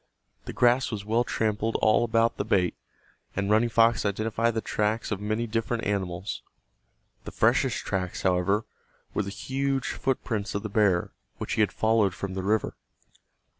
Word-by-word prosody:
The -, -, -5 dB
grass 125 Hz, +2 st, +3 dB
was 105 Hz, -3 st, -5 dB
well 115 Hz, +3 st, +2 dB
trampled 110 Hz, -1 st, -1 dB
all 110 Hz, +2 st, +4 dB
about 115 Hz, 0 st, +2 dB
the -, -, -1 dB
bait, 95 Hz, -5 st, +1 dB, 0.6 s
and 100 Hz, +1 st, -1 dB
Running 110 Hz, +2 st, +4 dB
Fox 115 Hz, 0 st, +4 dB
identified 110 Hz, +3 st, 0 dB
the -, -, +1 dB
tracks 110 Hz, +1 st, -1 dB
of 100 Hz, -1 st, -2 dB
many 110 Hz, +3 st, -1 dB
different 115 Hz, +1 st, -2 dB
animals. 90 Hz, -8 st, -2 dB, 0.8 s
The -, -, -6 dB
freshest -, -, +2 dB
tracks, 90 Hz, -2 st, -3 dB
however, 95 Hz, +4 st, +2 dB, 0.5 s
were -, -, +1 dB
the 100 Hz, -, -4 dB
huge 135 Hz, +5 st, -2 dB
footprints 110 Hz, -6 st, -2 dB
of 100 Hz, -, -2 dB
the 110 Hz, -, -4 dB
bear 100 Hz, -4 st, +2 dB, 0.3 s
which -, -, -4 dB
he -, -, +2 dB
had 105 Hz, -, +3 dB
followed 110 Hz, -4 st, +2 dB
from 100 Hz, -1 st, -5 dB
the 95 Hz, -, -3 dB
river. 105 Hz, +3 st, 0 dB
110 Hz, 165 wpm, -27 LUFS, 100-115 Hz, 0.8 s, all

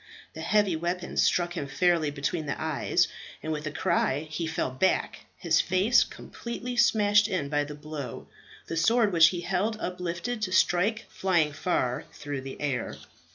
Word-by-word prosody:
The 160 Hz, -, -7 dB
heavy 200 Hz, +1 st, +2 dB
weapon 175 Hz, +2 st, -3 dB
struck 175 Hz, -1 st, +2 dB
him 155 Hz, -6 st, -4 dB
fairly 170 Hz, +1 st, +2 dB
between 145 Hz, +3 st, -3 dB
the 140 Hz, -, -3 dB
eyes, 160 Hz, -2 st, +1 dB, 0.4 s
and 160 Hz, -, -3 dB
with 155 Hz, 0 st, -3 dB
a -, -, -3 dB
cry 160 Hz, -4 st, +1 dB
he 165 Hz, +1 st, -2 dB
fell 160 Hz, -4 st, -2 dB
back, 130 Hz, +9 st, 0 dB
his 165 Hz, -1 st, +2 dB
face 190 Hz, +6 st, +3 dB
completely 240 Hz, +1 st, -7 dB
smashed 210 Hz, -3 st, +4 dB
in 185 Hz, -9 st, -2 dB
by 145 Hz, 0 st, +1 dB
the 150 Hz, 0 st, -8 dB
blow, 150 Hz, -4 st, -7 dB, 0.4 s
the 165 Hz, -, -4 dB
sword 220 Hz, +4 st, +3 dB
which 165 Hz, -1 st, +8 dB
he 175 Hz, 0 st, -2 dB
held 195 Hz, +5 st, -1 dB
uplifted 180 Hz, +6 st, -3 dB
to 195 Hz, -3 st, -1 dB
strike 185 Hz, +4 st, +2 dB
flying 170 Hz, -6 st, +1 dB
far 130 Hz, -6 st, -1 dB
through 145 Hz, -2 st, -5 dB
the 135 Hz, 0 st, -8 dB
air. 135 Hz, -5 st, -2 dB
170 Hz, 165 wpm, -27 LUFS, 150-190 Hz, 0.4 s, which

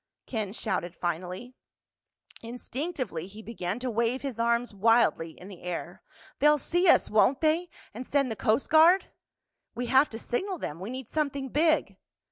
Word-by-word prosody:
Ken 215 Hz, -5 st, -3 dB
shouted 180 Hz, -5 st, -3 dB
finally. 180 Hz, +8 st, -4 dB, 0.9 s
Instinctively 245 Hz, -, -5 dB
he 210 Hz, +3 st, -12 dB
began 200 Hz, -4 st, -4 dB
to 250 Hz, 0 st, -3 dB
wave 235 Hz, +4 st, 0 dB
his 265 Hz, -5 st, -5 dB
arms 235 Hz, 0 st, +1 dB
wildly 215 Hz, -6 st, +2 dB
in 180 Hz, -, -11 dB
the 190 Hz, -4 st, -11 dB
air. 175 Hz, -1 st, -5 dB, 0.4 s
"They'll 300 Hz, +1 st, +5 dB
see 350 Hz, +5 st, 0 dB
us, -, -, +5 dB
won't 235 Hz, +5 st, +3 dB
they? 325 Hz, +3 st, +1 dB, 0.2 s
And 235 Hz, +4 st, -6 dB
send 275 Hz, -4 st, +1 dB
the -, -, -3 dB
Coast 215 Hz, +5 st, 0 dB
Guard?" 335 Hz, +5 st, +6 dB, 0.6 s
"We 245 Hz, -, -3 dB
have 265 Hz, +4 st, +4 dB
to 225 Hz, -, -7 dB
signal 370 Hz, -, -3 dB
them—we 185 Hz, -, -6 dB
need 260 Hz, -1 st, -7 dB
something 280 Hz, -3 st, -2 dB
big." 315 Hz, +4 st, +1 dB
240 Hz, 155 wpm, -28 LUFS, 205-280 Hz, 0.9 s, Guard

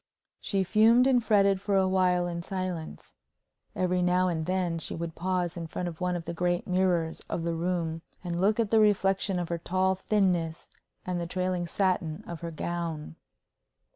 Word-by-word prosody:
She 195 Hz, -2 st, 0 dB
fumed 225 Hz, +6 st, +5 dB
and 255 Hz, -3 st, +3 dB
fretted 200 Hz, -3 st, +3 dB
for 200 Hz, -1 st, 0 dB
a 190 Hz, -1 st, +4 dB
while 180 Hz, -1 st, +2 dB
in 170 Hz, -1 st, -3 dB
silence. 185 Hz, -3 st, -5 dB, 0.6 s
Every 180 Hz, 0 st, +1 dB
now 180 Hz, +1 st, +3 dB
and 160 Hz, -2 st, -2 dB
then 180 Hz, -3 st, 0 dB
she -, -, -4 dB
would 165 Hz, 0 st, -4 dB
pause 180 Hz, -1 st, -1 dB
in 170 Hz, -1 st, -5 dB
front 180 Hz, +2 st, -4 dB
of 170 Hz, 0 st, -7 dB
one 180 Hz, 0 st, 0 dB
of 170 Hz, -2 st, -5 dB
the -, -, -4 dB
great 175 Hz, +1 st, 0 dB
mirrors 180 Hz, -3 st, +1 dB
of 165 Hz, -, -2 dB
the 170 Hz, 0 st, -1 dB
room, 165 Hz, -1 st, -2 dB, 0.2 s
and 175 Hz, -1 st, -2 dB
look 210 Hz, +4 st, +3 dB
at 220 Hz, -3 st, +1 dB
the 225 Hz, -, +5 dB
reflection 195 Hz, -2 st, +2 dB
of 175 Hz, -2 st, -3 dB
her 170 Hz, -1 st, -2 dB
tall 185 Hz, +2 st, +1 dB
thinness 185 Hz, -4 st, 0 dB, 0.4 s
and 180 Hz, -1 st, -2 dB
the 170 Hz, -, -3 dB
trailing 180 Hz, 0 st, -1 dB
satin 175 Hz, -4 st, -1 dB
of 170 Hz, -2 st, -7 dB
her 170 Hz, -, -4 dB
gown. 165 Hz, -, -4 dB
180 Hz, 185 wpm, -28 LUFS, 170-190 Hz, 0.6 s, fumed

